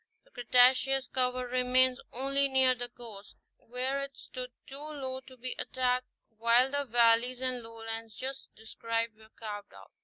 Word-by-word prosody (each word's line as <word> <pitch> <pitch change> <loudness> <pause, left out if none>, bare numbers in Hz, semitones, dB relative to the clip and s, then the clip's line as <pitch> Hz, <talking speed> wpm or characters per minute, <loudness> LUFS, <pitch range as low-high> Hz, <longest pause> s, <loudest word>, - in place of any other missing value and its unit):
The - - -28
Cretaceous 255 +2 +4
cover 255 -1 +1
remains 255 +1 +3
only 275 +2 +1
near 265 -1 +4
the 245 -1 -6
coast, 220 -4 -10 0.2
where 255 +3 -2
it 275 -1 -7
stood 250 0 -7 0.2
too 275 +1 -8
low 275 -4 -5
to 260 0 -16
be 255 +1 -5
attacked 255 -1 0 0.3
while 235 +3 +4
the 285 0 -1
valleys 240 +1 +3
and 255 -1 -1
lowlands 225 -1 -6
just 270 +1 -5
described 230 +1 -3
were 220 0 -19
carved 205 -2 -8
out. - - -15
250 Hz, 155 wpm, -30 LUFS, 230-260 Hz, 0.3 s, Cretaceous